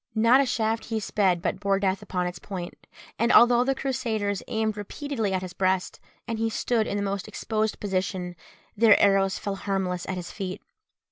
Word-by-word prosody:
Not 230 +5 +5
a 275 - 0
shaft 225 -1 0
he 225 -1 -2
sped 190 -4 +1
but 190 - -1
bore 200 -1 +1
death 195 -1 0
upon 180 -1 -2
its 180 0 -5
point; 180 -3 -8 0.3
and 235 +2 +3
although 240 0 +6
the 270 +1 0
Crusaders 225 -7 -2
aimed 220 -1 -1
repeatedly 220 +1 -3
at 185 -1 -1
his 185 -1 -7
breast, 185 -1 0 0.3
and 225 -1 -3
he 225 0 +1
stood 225 0 0
in 205 - -2
the 200 - -1
most 200 -1 -3
exposed 220 -1 -2
position, 185 -2 -2 0.4
their 220 -1 +6
arrows 195 -1 +3
fell 200 -1 -4
harmless 190 -3 -2
at 190 - -1
his 175 -1 -6
feet. 190 -2 -5
200 Hz, 190 wpm, -26 LUFS, 190-225 Hz, 0.4 s, although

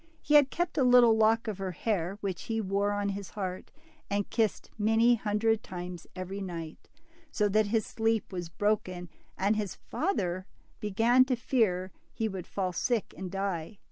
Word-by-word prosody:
He 300 - -2
had 290 -2 +7
kept 345 -1 -1
a - - +4
little 245 -2 +7
lock 225 +2 +3
of 205 -3 -3
her 190 -2 -3
hair, 195 -1 -1
which 190 -4 -4
he 225 -1 -1
wore 200 0 0
on 205 0 -1
his 200 -1 -5
heart, 185 -3 -5 0.4
and 200 0 0
kissed 225 -3 0
many 225 +3 +4
hundred 220 0 +1
times 180 -3 -7
every 190 +2 -5
night, 165 -4 -7 0.4
so 210 - +2
that 215 +1 +3
his 220 0 +1
sleep 225 -2 -1
was 175 -2 -4
broken, 185 -2 -1 0.3
and 200 +3 +2
his 210 -3 -3
father 185 - -2 0.3
began 225 +5 +4
to 255 -1 +1
fear 205 -7 +1 0.2
he 225 - -1
would 190 -4 -6
fall 185 -2 -2
sick 235 +3 -1
and 190 -1 -6
die. 195 0 -3
205 Hz, 170 wpm, -30 LUFS, 185-225 Hz, 0.4 s, had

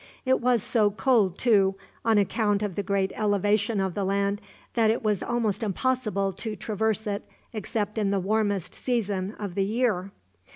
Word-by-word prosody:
It 260 0 +3
was 240 -3 +2
so 215 -4 +3
cold, 210 -3 +2
too, 200 -5 +3 0.3
on 225 -2 +3
account 205 0 +1
of 205 -3 -2
the - - 0
great 195 -1 0
elevation 205 +1 +1
of 190 -2 0
the 200 - -2
land, 200 +1 0 0.3
that 225 -2 +3
it 230 +2 0
was 210 -3 +1
almost 240 -3 -1
impossible 215 -2 0
to 215 +3 -5
traverse 220 +1 -1
it 205 -1 -2 0.3
except 210 0 -2
in 205 -2 +1
the 200 0 +1
warmest 205 -1 0
season 205 -5 -2
of 200 -4 -5
the 195 - +1
year. 210 -3 0
205 Hz, 170 wpm, -26 LUFS, 195-225 Hz, 0.3 s, It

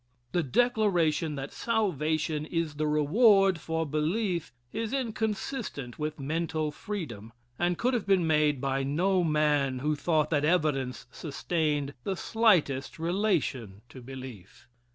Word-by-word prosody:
The 175 - +1
declaration 170 - +1
that 135 0 -5
salvation 155 - 0
is 165 -3 -2
the 155 0 0
reward 190 - +4
for 160 0 -2
belief 170 +4 -1 0.2
is 225 +1 -3
inconsistent 220 - -3
with 155 0 -3
mental 155 +1 -1
freedom, 130 - -6 0.3
and 175 0 +1
could 255 +2 +1
have 230 -5 -1
been 190 -3 +3
made 150 -3 +2
by 135 0 0
no 175 +7 +1
man 150 -4 +2
who 150 +4 0
thought 155 0 +1
that 145 -2 +2
evidence 150 -6 +1
sustained 150 -2 -2
the 195 - -1
slightest 180 - +2
relation 160 - -1
to 130 - -11
belief. 130 -7 -10
155 Hz, 130 wpm, -29 LUFS, 145-190 Hz, 0.3 s, reward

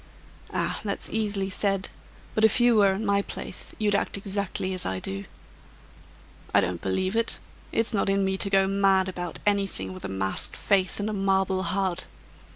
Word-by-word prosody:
"Ah! - - -1
that's 200 -2 -1
easily 205 -3 -1
said; 195 0 0 0.4
but 220 - 0
if 220 +2 +5
you 240 -1 +5
were 200 -2 +5
in 210 +3 -3
my 200 0 +3
place, - - -7
you'd 210 -1 +1
act 200 - 0
exactly 195 -1 -2
as 185 - +2
I 95 0 -2
do." 100 +1 -4 1.3
"I - - +8
don't 90 -1 -1
believe 185 - -1
it. 230 0 +1 0.3
It's 225 +1 0
not 200 -1 +1
in 195 0 +2
me 190 0 0
to 200 - +3
go 195 -1 +4
mad 195 -1 +3
about 175 -2 -5
anything 195 - 0
with 95 - -10
a - - -4
masked 95 0 -1
face 190 -2 +1
and 205 - -1
a 215 - -2
marble 190 -1 +1
heart. 185 0 0
195 Hz, 180 wpm, -26 LUFS, 185-200 Hz, 1.3 s, I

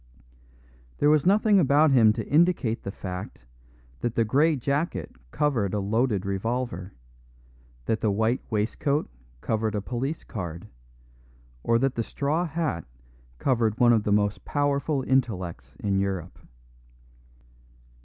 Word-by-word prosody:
There 145 - +4
was 155 +1 +3
nothing 205 +1 +4
about 145 0 +4
him 115 -5 +6
to - - -5
indicate 155 -8 +2
the 100 - -5
fact 90 -10 -7 0.5
that 120 -1 -2
the 115 - +2
grey 150 +8 +3
jacket 140 - -2
covered 115 - 0
a - - 0
loaded 105 0 0
revolver, 100 -1 -3 0.9
that 110 - -1
the 110 - +2
white 110 +5 +1
waistcoat 120 +7 0 0.3
covered 110 -1 -1
a - - 0
police 130 +8 -3
card, 85 -5 -6 1.0
or 115 - +2
that 135 +2 +1
the 115 - -2
straw 150 +9 -1
hat 155 - -2 0.5
covered 115 - +1
one 120 -1 +6
of 110 - +3
the 105 - -2
most 105 0 +1
powerful 145 -1 0
intellects 90 - -1
in 100 -2 0
Europe. 95 -3 -3
115 Hz, 130 wpm, -26 LUFS, 100-140 Hz, 1.0 s, him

